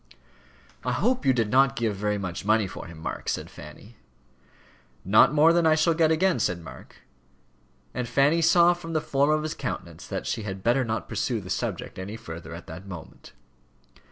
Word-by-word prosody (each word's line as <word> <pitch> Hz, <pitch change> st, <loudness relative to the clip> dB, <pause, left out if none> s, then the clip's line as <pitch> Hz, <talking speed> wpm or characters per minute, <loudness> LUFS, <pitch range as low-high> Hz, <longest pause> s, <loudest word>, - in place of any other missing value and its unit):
"I -, -, -1 dB
hope 250 Hz, -, 0 dB
you -, -, +7 dB
did 115 Hz, -4 st, 0 dB
not 135 Hz, +1 st, +4 dB
give 115 Hz, -4 st, -1 dB
very 105 Hz, +1 st, -1 dB
much 95 Hz, -3 st, -5 dB
money 110 Hz, +1 st, +3 dB
for 95 Hz, -, -8 dB
him, 85 Hz, -1 st, -11 dB
Mark," 80 Hz, -, -5 dB
said -, -, -3 dB
Fanny. 105 Hz, +9 st, -13 dB, 1.1 s
"Not 105 Hz, +6 st, +6 dB
more 155 Hz, +2 st, +5 dB
than 170 Hz, -1 st, +3 dB
I 155 Hz, -, +5 dB
shall 160 Hz, +2 st, +3 dB
get 160 Hz, -1 st, +3 dB
again," 165 Hz, 0 st, +2 dB
said 90 Hz, -6 st, 0 dB
Mark; 80 Hz, -, -13 dB, 0.9 s
and 125 Hz, -2 st, -3 dB
Fanny 140 Hz, +7 st, +3 dB
saw 170 Hz, +1 st, +5 dB
from 165 Hz, -1 st, -8 dB
the 155 Hz, -, +2 dB
form 140 Hz, 0 st, +1 dB
of 155 Hz, 0 st, +2 dB
his 155 Hz, -, -3 dB
countenance -, -, -6 dB
that -, -, -4 dB
she -, -, -2 dB
had 95 Hz, -2 st, -6 dB
better 125 Hz, +3 st, +3 dB
not 110 Hz, -3 st, -3 dB
pursue -, -, -1 dB
the -, -, -8 dB
subject -, -, -3 dB
any 100 Hz, +4 st, -6 dB
further 80 Hz, -4 st, -9 dB
at 85 Hz, -, -10 dB
that 90 Hz, +5 st, -10 dB
moment. 90 Hz, -4 st, -11 dB
120 Hz, 190 wpm, -26 LUFS, 95-155 Hz, 1.1 s, you